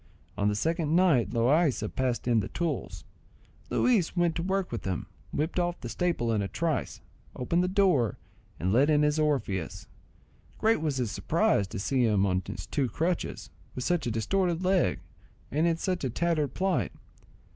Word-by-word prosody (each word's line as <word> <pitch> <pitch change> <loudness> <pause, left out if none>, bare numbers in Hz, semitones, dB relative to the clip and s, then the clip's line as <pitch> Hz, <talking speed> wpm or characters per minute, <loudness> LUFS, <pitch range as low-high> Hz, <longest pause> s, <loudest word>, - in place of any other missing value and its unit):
On 100 - 0
the 105 - +1
second 160 - 0
night 155 - +4
Loaysa 125 +1 +2
passed 125 -2 -1
in 120 -2 +4
the 100 - -2
tools, 170 -1 -3 0.7
Luis 205 -8 +2
went 175 -1 +3
to 165 - -2
work 190 +1 -1
with 115 - -3
them, 95 -3 -3 0.3
whipped 160 +4 -1
off 175 0 -1
the 120 - -6
staple 120 -4 0
in 105 - +1
a 100 - -1
trice, 160 +5 -2 0.3
opened 170 +8 0
the - - +1
door, 180 - +2 0.4
and 95 +3 0
let 135 +6 +4
in 150 -1 +4
his 150 +1 +2
Orpheus. 130 - -1 0.7
Great 220 -6 +2
was 150 -4 -1
his 120 -5 -1
surprise 100 - +1
to 105 - -6
see 125 +6 +1
him 105 -4 +3
on 95 -1 +1
his 90 +1 -6
two 130 +5 -1
crutches, 165 +9 -2 0.2
with 125 - -3
such 175 -1 0
a - - 0
distorted 175 - 0
leg, 185 -1 +2 0.5
and 155 +4 +2
in 165 -1 +1
such 180 0 -2
a 130 - 0
tattered 155 0 0
plight. 190 -1 0
150 Hz, 180 wpm, -28 LUFS, 115-175 Hz, 0.7 s, night